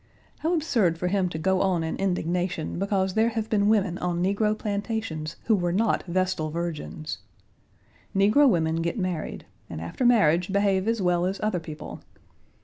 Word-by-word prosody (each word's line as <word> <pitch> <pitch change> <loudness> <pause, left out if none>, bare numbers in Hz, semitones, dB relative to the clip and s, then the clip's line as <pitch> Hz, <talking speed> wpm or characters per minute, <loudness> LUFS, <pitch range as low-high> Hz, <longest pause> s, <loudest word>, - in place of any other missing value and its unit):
How 335 +3 +1
absurd 225 - +1
for 180 +2 -1
him 190 -1 +1
to 160 - -5
go 190 +4 +1
on 180 -4 +1
in 160 - -2
indignation 180 -3 -1
because 195 -1 0
there 220 +3 +3
have 220 -1 -4
been 205 -1 +3
women 200 -5 +2
on 175 -1 -1
negro 210 +3 +1
plantations 200 -7 -3
who 225 - +3
were 175 -3 0
not 210 +5 +1
vestal 185 -3 0
virgins. 160 -1 -4 1.0
Negro 210 +9 +5
women 160 -5 +1
get 170 +7 -2
married, 180 -5 -3 0.2
and - - -6
after 85 - -4
marriage 190 -7 +4
behave 200 0 +2
as 230 -3 0
well 180 0 +2
as 190 +1 -3
other 210 -4 0
people. 155 -2 -8
190 Hz, 165 wpm, -26 LUFS, 170-210 Hz, 1.0 s, Negro